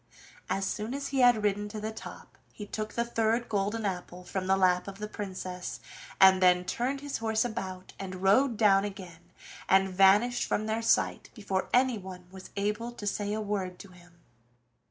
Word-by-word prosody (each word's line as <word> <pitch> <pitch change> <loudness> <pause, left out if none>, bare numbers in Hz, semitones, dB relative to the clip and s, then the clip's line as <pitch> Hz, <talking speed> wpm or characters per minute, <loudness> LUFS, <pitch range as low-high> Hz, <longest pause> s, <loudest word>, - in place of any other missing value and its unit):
As 195 0 0
soon 215 +6 -3
as 280 0 -4
he 270 - -1
had 245 -4 +5
ridden 205 0 0
to 215 - -6
the 215 +1 -4
top, 220 - -10 0.2
he 210 - -8
took 215 +1 -5
the 235 - 0
third 230 0 0
golden 210 +1 -1
apple 180 -1 -4
from 185 +1 -4
the 190 0 +3
lap 180 -1 +2
of 195 0 -7
the 210 0 -5
Princess 185 -3 -6 0.4
and 190 -1 +7
then 180 -1 +4
turned 260 +7 -2
his 285 -4 -4
horse 220 +1 +1
about 190 -6 -5
and 185 -1 -5
rode 230 +5 +4
down 200 -3 +5
again, 185 -4 -8 0.4
and 190 0 +4
vanished 195 +6 +4
from 215 - -1
their 220 +1 -1
sight 225 - +1
before 195 -4 -2
anyone 205 -8 0
was 190 -1 -11
able 210 +4 -2
to 215 - -8
say 205 0 -1
a 215 - -1
word 195 -3 -3
to 200 - -12
him. 175 -1 -19
205 Hz, 185 wpm, -29 LUFS, 190-220 Hz, 0.4 s, and